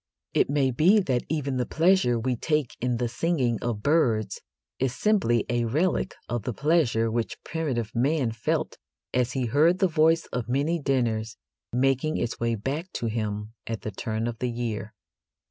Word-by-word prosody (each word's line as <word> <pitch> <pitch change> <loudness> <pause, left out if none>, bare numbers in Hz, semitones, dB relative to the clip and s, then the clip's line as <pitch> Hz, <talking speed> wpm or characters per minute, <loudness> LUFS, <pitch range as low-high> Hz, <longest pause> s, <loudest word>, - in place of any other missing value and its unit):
It - - +3
may 140 -2 +2
be 175 - +5
that 130 -10 0
even 140 -4 -1
the 125 - 0
pleasure 165 -8 +3
we 125 +2 0
take 150 +1 -1
in 125 -1 0
the 120 0 0
singing 125 -2 0
of 115 -4 -3
birds 115 -10 +2 0.4
is 130 -1 0
simply 135 - +2
a 120 -1 0
relic 170 +9 0
of 120 -1 -2
the 115 +2 -4
pleasure 135 -7 +2
which 115 0 -2
primitive 130 -9 -2
man 130 0 +1
felt 115 0 -2 0.3
as 125 0 +1
he 130 -2 0
heard 150 +9 +4
the 190 - +3
voice 165 0 +3
of 125 -1 -3
many 145 +7 +1
dinners 115 -6 0 0.3
making 135 +5 +1
its 115 - -2
way 115 0 +1
back 145 - -4
to - - -3
him 105 -1 -3
at 115 -2 -3
the 110 - -4
turn 110 +2 -3
of 120 -1 -4
the 125 - -1
year. 115 -3 -4
125 Hz, 175 wpm, -26 LUFS, 115-155 Hz, 0.4 s, be